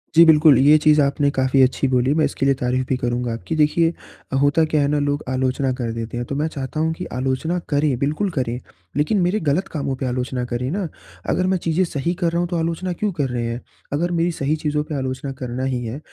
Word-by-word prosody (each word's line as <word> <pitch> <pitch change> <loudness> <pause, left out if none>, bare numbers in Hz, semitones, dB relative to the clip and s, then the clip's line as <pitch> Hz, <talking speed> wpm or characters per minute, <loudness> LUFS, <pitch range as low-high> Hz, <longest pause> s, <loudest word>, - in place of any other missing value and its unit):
जी, 165 - +9
बिल्कुल। 155 -3 +6
ये 145 +4 +6
चीज़ 155 0 +4
आपने 140 +1 +2
काफ़ी 130 0 +2
अच्छी 130 +1 +3
बोली, 130 +1 +2
मैं 155 0 +2
इसके - - -2
लिए 135 -1 +3
तारीफ़ 125 +1 -1
भी 130 - +2
करूँगा 120 -1 -1
आपकी। 140 +8 -4
देखिए 165 +2 +3 0.5
होता 145 +3 +3
क्या 155 -1 +1
है 140 - +2
ना 145 0 +1
लोग 145 +1 -1
आलोचना 130 +1 0
कर 115 -2 -2
देते 115 +1 -5
हैं, 120 - -3
तो 140 - -4
मैं 150 +2 0
चाहता 140 0 -5
हूँ 160 +1 +1
कि 180 - -6
आलोचना 130 +7 -1
करें, 145 -3 +1
बिल्कुल 155 +8 0
करें, 125 -5 -2 0.4
लेकिन 155 +8 +2
मेरे 180 +5 +1
ग़लत 160 +3 0
कामों 140 -4 -2
पे 130 0 -4
आलोचना 125 0 -2
करे 125 +1 -3
ना! 190 -1 -2 0.4
अगर 185 0 +1
मैं 190 - +2
चीज़ें 170 +1 0
सही 165 +2 -2
कर 170 -1 +2
रहा 170 - 0
हूँ 175 - 0
तो 175 - -1
आलोचना 170 +2 -2
क्यों 210 +3 -1
कर 145 -5 -1
रहे 120 -1 -2
हैं? 115 +1 -3 0.3
अगर 175 +4 0
मेरी 170 +1 +1
सही 150 0 -1
चीज़ों 150 -1 -1
पे 150 0 -5
आलोचना 130 0 -3
करना 125 0 -4
ही 130 -2 -1
है 120 +6 -5
145 Hz, 240 wpm, -21 LUFS, 130-160 Hz, 0.5 s, जी